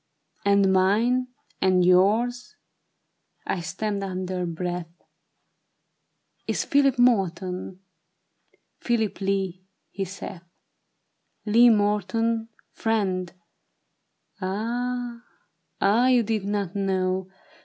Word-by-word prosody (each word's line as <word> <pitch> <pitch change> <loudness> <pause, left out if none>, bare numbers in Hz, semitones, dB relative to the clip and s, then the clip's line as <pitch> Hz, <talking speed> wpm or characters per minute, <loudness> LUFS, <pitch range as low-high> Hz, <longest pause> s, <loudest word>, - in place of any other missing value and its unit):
"And 200 -1 +4
mine 225 +7 +2 0.2
?" - - -38
"And 185 -1 +3
yours," 220 +7 +2 0.9
I 190 - -1
stammered 200 +4 -3
under 185 -1 -3
breath, 175 0 -4 0.8
" - - -48
Is - - -1
Philip 275 -2 +3
Morton." 190 -5 0 0.5
" - - -42
Phihp 225 -4 0
Lee," 190 -1 -2 0.2
he 195 -1 -3
saith. 185 -1 -8 0.6
" - - -50
Lee 230 +3 +6
Morton, 220 +2 +1 0.2
friend; 190 -5 -1 1.1
ah, 235 +5 -3 0.6
ah 225 +6 +3
you 250 -2 +4
did 215 -2 -2
not 200 -2 -2
know. 190 -1 -1
200 Hz, 95 wpm, -25 LUFS, 185-230 Hz, 1.1 s, Lee